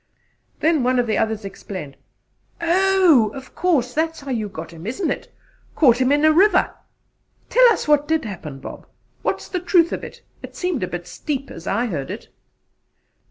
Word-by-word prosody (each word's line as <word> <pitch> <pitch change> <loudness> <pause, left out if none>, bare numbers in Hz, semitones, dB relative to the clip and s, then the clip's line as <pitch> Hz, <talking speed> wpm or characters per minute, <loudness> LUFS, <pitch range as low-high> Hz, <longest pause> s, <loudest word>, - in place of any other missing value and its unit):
'" - - -43
Then 320 -2 +3
one 255 +1 +2
of 245 - +2
the 220 - 0
others 220 -2 -1
exclaimed: 185 -7 -8 0.6
"Oh! 350 - +4
Of 265 -1 -10
course, 285 -9 +1
that's 320 +2 -1
how 275 -1 -6
you 220 -4 -2
got 180 - -8
him, 165 +4 -9
isn't 295 - -1
it: - - -5 0.4
caught 255 -5 +4
him 255 +1 +3
in 295 +1 +3
a 310 - +6
river? 370 +3 +4 0.8
Tell - - +6
us 435 - -1
what 295 -1 +3
did 320 -4 0
happen, 170 -9 -7
Bob. - - -10 0.3
What's - - -2
the 365 - -2
truth 345 -1 +3
of - - -4
it? - - -10 0.2
It - - -10
seemed 360 -7 -2
a 185 - -1
bit 175 0 -6
steep 275 - -5
as 165 - -10
I 240 - +1
heard 155 - -4
it." - - -7
275 Hz, 190 wpm, -21 LUFS, 215-335 Hz, 0.8 s, a